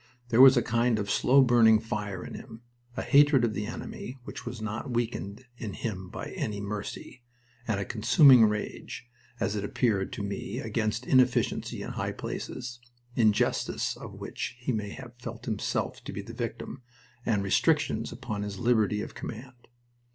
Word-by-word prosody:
There 120 +1 +5
was 135 -1 +9
a 120 - +3
kind 120 0 +2
of 100 -2 -2
slow 135 +6 +5
burning 115 -3 +6
fire 105 -4 -4
in - - -8
him 115 -1 -10 0.3
a - - -1
hatred 145 -3 +5
of 110 - -1
the 105 0 -3
enemy 120 +2 -7
which - - -8
was 125 - -5
not 110 +5 -4
weakened 115 -2 -3
in 110 -4 -5
him 95 -5 -5
by - - -6
any 105 -2 -3
mercy, 105 +4 -6 0.5
and 110 -3 0
a 100 - -2
consuming 125 - +6
rage, 105 +3 -4 0.3
as 110 -2 0
it 105 - -2
appeared 100 -2 0
to 100 - -4
me, 100 -1 -4
against 110 +1 -2
inefficiency 130 -2 +2
in - - -5
high - - -3
places, 120 -1 -6 0.4
injustice 110 -3 +1
of - - -9
which - - -5
he 120 +2 -2
may 105 -3 -2
have 125 +2 -9
felt 115 -2 -7
himself 110 -4 -2
to - - -5
be 100 - -5
the 115 - -9
victim, 115 +2 -5 0.4
and 105 -5 +1
restrictions 150 - +1
upon 120 -4 -5
his 100 -1 -4
liberty 110 -3 +2
of - - -8
command. 125 +2 -9
115 Hz, 170 wpm, -28 LUFS, 105-125 Hz, 0.5 s, was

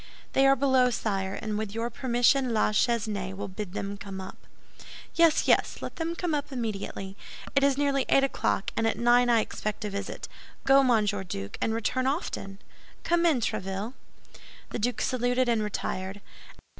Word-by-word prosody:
"They 270 0 +5
are 270 - +6
below, 260 -2 +3
sire, 195 -5 -2
and 215 -1 -3
with 215 -1 -4
your 230 +1 -2
permission 245 0 +2
La 215 - +3
Chesnaye 210 -4 0
will 200 +1 -5
bid 190 -1 -6
them 200 0 -4
come 195 -1 -7
up." 190 0 -10 0.7
"Yes, 335 -2 +4
yes, - - +3
let - - -7
them 330 0 -2
come 345 -2 -2
up 290 -1 -2
immediately. 205 -5 -4 0.4
It 275 - +4
is 280 -1 +3
nearly 280 -2 +1
eight 275 - +5
o'clock, 265 -6 0
and 225 - +1
at - - 0
nine 245 +1 +4
I 230 -2 +5
expect 215 0 -4
a 210 - -3
visit. 200 0 -5 0.4
Go, 270 0 +6
Monsieur 210 -6 +2
Duke, 100 - -6
and 225 - +1
return 255 +3 0
often. 230 - -3 0.5
Come 345 0 +3
in, 285 -7 +2
Tréville." 195 +3 -3 0.8
The - - -3
Duke 245 +3 -1
saluted 250 0 +1
and 230 -2 +2
retired. 195 -1 -3
230 Hz, 170 wpm, -28 LUFS, 200-265 Hz, 0.8 s, are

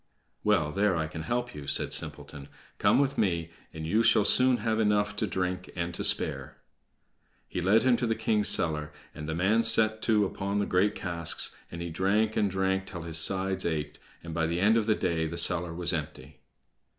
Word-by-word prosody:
"Well, 75 0 +1
there 100 0 +1
I 80 -1 -1
can 80 0 -7
help 120 +7 -3
you," 70 -1 -9
said - - +3
Simpleton. 70 -1 -3 0.3
"Come - - +3
with 140 0 0
me, 85 -5 -1 0.2
and 80 0 -7
you 105 +8 +2
shall 110 -2 +4
soon 130 -1 +4
have 110 -2 -1
enough 105 -1 +1
to 110 - 0
drink 90 -1 -3
and 85 0 -3
to - - -3
spare." 70 -1 +2 0.9
He 90 - -4
led 100 +5 +3
him 130 -2 +3
to 120 - -1
the 115 - 0
king's 110 -2 +1
cellar, 75 -2 +1 0.2
and 75 +1 -8
the 80 - -2
man 100 +6 +2
set 110 -1 +2
to 105 -3 +2
upon 100 +1 -3
the 100 - 0
great 100 +3 +1
casks, 85 -3 -3 0.2
and 85 0 -7
he 85 - -6
drank 105 +6 0
and 105 -2 +1
drank 95 0 -1
till 85 -3 -7
his 80 -1 -1
sides 95 +2 +1
ached, 75 -3 -3 0.2
and 85 -1 -7
by 80 0 0
the 85 +1 -2
end 105 +4 +3
of 115 -2 0
the 110 - +3
day 85 -5 -1
the 85 +2 -6
cellar 85 0 +2
was 85 +1 -1
empty. 75 -3 -6
95 Hz, 205 wpm, -28 LUFS, 80-105 Hz, 0.9 s, shall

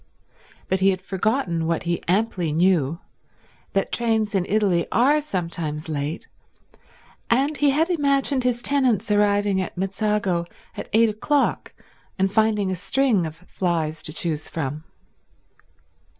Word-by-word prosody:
But 190 - 0
he 190 +1 +4
had 185 -1 0
forgotten 190 -3 -1
what 165 -1 -1
he 170 0 -1
amply 185 -3 0
knew, 165 -2 +2 0.8
that 195 - 0
trains 220 -3 +1
in 185 -3 0
Italy 195 -5 +2
are 285 +6 +3
sometimes 165 - -4
late, 150 +1 -3 1.0
and 275 +6 +2
he 290 0 +3
had 305 +4 +2
imagined 280 -5 +1
his 245 -1 0
tenants 255 -8 +1
arriving 205 -1 +2
at 185 - -6
Mezzago 195 -2 -1 0.3
at - - -7
eight 225 +1 +4
o'clock 275 +7 0 0.4
and 190 0 +1
finding 215 -3 +2
a - - -1
string 210 -1 +1
of 155 - -9
flys 165 -3 -2
to - - -2
choose 155 -1 -2
from. 150 -1 -4
195 Hz, 135 wpm, -23 LUFS, 170-230 Hz, 1.0 s, he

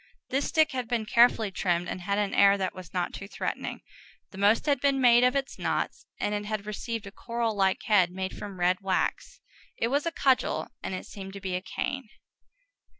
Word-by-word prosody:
This 275 +2 0
stick 315 -1 +3
had 255 -3 -3
been 230 -2 -1
carefully 230 -2 +4
trimmed, 175 -2 0
and 185 - -4
had 200 +2 -1
an 205 -1 0
air 200 0 +6
that 190 -2 -2
was 185 -3 -10
not 180 -1 -2
too 200 - -7
threatening; - - -4 0.5
the 190 - -11
most 205 +3 +4
had 285 -4 +2
been 275 -1 +2
made 245 -1 +6
of 250 +2 +4
its 275 -1 -2
knots, 470 - -2
and 205 - -1
it 205 0 -2
had 210 -1 -3
received 220 +1 -4
a 200 - -8
coral 235 +1 -2
like 190 -1 +1
head, 190 -5 +4
made 190 +1 -4
from 200 -3 -8
red 180 +2 +2
wax: 190 -1 -1 0.4
it 230 - 0
was 285 +5 +1
a - - 0
cudgel, 265 -5 +1
and 190 - -3
it - - -6
seemed 195 -1 -9
to 200 - -7
be 190 -1 -4
a 180 - -2
cane. 260 +5 -4
210 Hz, 210 wpm, -28 LUFS, 190-245 Hz, 0.5 s, air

